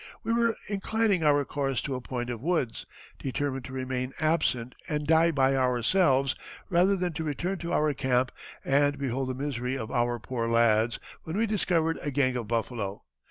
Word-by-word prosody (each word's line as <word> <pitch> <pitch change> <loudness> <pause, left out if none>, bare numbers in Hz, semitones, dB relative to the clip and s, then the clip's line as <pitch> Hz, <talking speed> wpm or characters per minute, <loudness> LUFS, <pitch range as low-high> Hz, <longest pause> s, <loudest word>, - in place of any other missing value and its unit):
We 230 - 0
were 230 -1 +2
inclining 205 -2 +1
our 145 -2 +4
course 135 -2 -1
to 140 - -3
a 130 - -3
point 120 -1 -4
of 115 -2 -5
woods, 155 -7 -1 0.3
determined 135 0 -2
to - - -9
remain 130 0 -3
absent 150 -6 +1 0.2
and 150 -1 -1
die 160 +2 +5
by 135 -3 +3
ourselves 130 +2 +3 0.4
rather 180 +3 +4
than 180 -2 -1
to 160 - -3
return 170 +6 -2
to 170 - -4
our 150 -1 +2
camp 125 -1 +1 0.3
and 145 +1 +3
behold 135 -1 -2
the 130 - -2
misery 130 -2 -2
of 110 -2 -5
our 120 -1 +1
poor 115 0 -3
lads, 115 0 +3 0.2
when 160 +4 -5
we 225 - +3
discovered 175 -6 +1
a 145 - -2
gang 130 -2 +1
of 120 -3 -3
buffalo." 110 -3 -2
135 Hz, 180 wpm, -28 LUFS, 125-165 Hz, 0.4 s, die